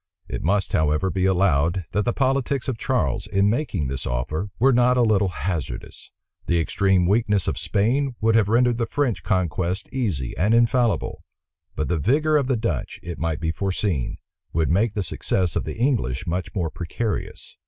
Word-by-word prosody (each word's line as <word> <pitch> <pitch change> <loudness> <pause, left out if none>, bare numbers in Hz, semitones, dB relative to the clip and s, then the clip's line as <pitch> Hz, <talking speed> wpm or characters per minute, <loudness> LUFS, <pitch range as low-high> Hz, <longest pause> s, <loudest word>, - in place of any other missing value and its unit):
It - - -4
must, 95 -1 0
however, 80 +4 +1
be 95 0 0
allowed, 90 -2 +2
that 105 - 0
the 120 - +2
politics 135 0 0
of 125 -4 -2
Charles, 125 -4 0
in 100 +1 +2
making 120 - -1
this 65 0 -4
offer, 75 +11 -2
were 135 +3 +4
not 125 +1 +4
a 125 - +4
little 105 -3 +3
hazardous. 85 -2 -5 0.4
The 85 -1 +2
extreme 95 +2 +2
weakness 105 0 +2
of - - -1
Spain 120 +6 0
would 110 +1 +2
have 110 -3 +3
rendered 120 +1 +3
the 115 - 0
French 140 -7 -1
conquests 90 -1 -1
easy 95 - -2
and 105 +6 +2
infallible; 120 -1 +1 0.5
but 75 - -1
the 85 -2 0
vigor 150 - +2
of 140 -3 +2
the 130 -3 +1
Dutch, 110 - -3
it 85 -1 -6
might 80 -2 -1
be 80 0 -1
foreseen, 90 - -2 0.4
would 80 -1 +1
make 100 +4 +2
the 100 - 0
success 90 +1 -1
of - - -1
the - - -5
English 115 - 0
much 90 +4 -3
more 85 -5 -1
precarious. 100 +7 -4
100 Hz, 180 wpm, -23 LUFS, 85-120 Hz, 0.5 s, were